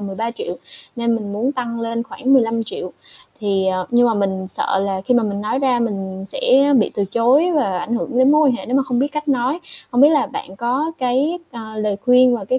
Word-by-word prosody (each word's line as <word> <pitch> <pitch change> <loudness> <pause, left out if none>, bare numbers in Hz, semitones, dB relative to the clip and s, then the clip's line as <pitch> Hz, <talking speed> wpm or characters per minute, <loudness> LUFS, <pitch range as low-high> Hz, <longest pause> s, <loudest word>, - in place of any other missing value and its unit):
13.000.000 225 - -4 0.4
nên 235 -1 +1
mình 210 -3 -4
muốn 240 +7 -1
tăng 235 -3 -4
lên 230 0 -2
khoảng 270 +1 -2
15.000.000. 225 -6 0 0.5
Thì, 195 -2 0
à 185 0 +1
nhưng 240 0 +4
mà 225 - +1
mình 190 -2 -1
sợ 195 +1 -1
là 195 -1 -2
khi 250 - +3
mà 240 - +3
mình 200 -1 -2
nói 215 +5 -1
ra 260 -3 +2
mình 195 -4 -3
sẽ 285 - +3
bị - - 0
từ 200 - 0
chối 250 - +2
và 195 -11 0
ảnh 235 +6 -3
hưởng 245 +1 -2
đến 260 +2 +5
mối 300 -1 +4
quan 245 - +1
hệ - - -9
nếu 255 +2 0
mà 275 - +3
không 255 -2 -2
biết 280 +2 +1
cách 300 0 -5
nói, 265 +4 +1 0.3
hông 245 - +1
biết 295 - +8
là 300 -3 +2
bạn 190 +1 -8
có 260 +8 -1
cái, 270 +7 0
à, 220 -2 -9
lời 210 -2 -1
khuyên 250 +3 +4
và 200 - -7
cái 255 +6 0
240 Hz, 235 wpm, -19 LUFS, 205-265 Hz, 0.5 s, biết